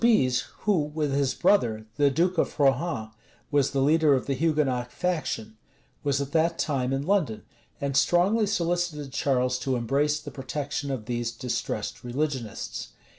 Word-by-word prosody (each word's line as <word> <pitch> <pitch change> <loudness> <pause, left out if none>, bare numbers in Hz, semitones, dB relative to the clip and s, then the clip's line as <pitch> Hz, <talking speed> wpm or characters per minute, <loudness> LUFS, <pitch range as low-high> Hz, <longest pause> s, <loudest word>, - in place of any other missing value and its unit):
Soubize, 130 - +4 0.2
who, 190 -8 +2
with 150 -3 0
his 140 -2 +1
brother, 110 - +2
the 145 -1 +5
duke 170 +5 +1
of - - -1
Rohan, 135 -5 +1 0.4
was 140 -2 +3
the 135 -1 +1
leader 155 0 +4
of 130 - -2
the 140 - 0
Hugonot 135 -4 0
faction, 135 -11 -2 0.5
was 140 -1 +1
at 140 0 -3
that 165 +1 +2
time 135 -4 0
in 135 +1 -1
London, 165 - +1 0.4
and 140 -1 -2
strongly 195 +9 +3
solicited 170 -7 -1
Charles 125 -2 +1
to 130 0 -1
embrace 140 +5 +1
the - - -9
protection 140 +1 -4
of 130 -6 -3
these 120 0 -2
distressed 120 +1 -3
religionists. 130 -2 -3
140 Hz, 155 wpm, -27 LUFS, 125-160 Hz, 0.5 s, the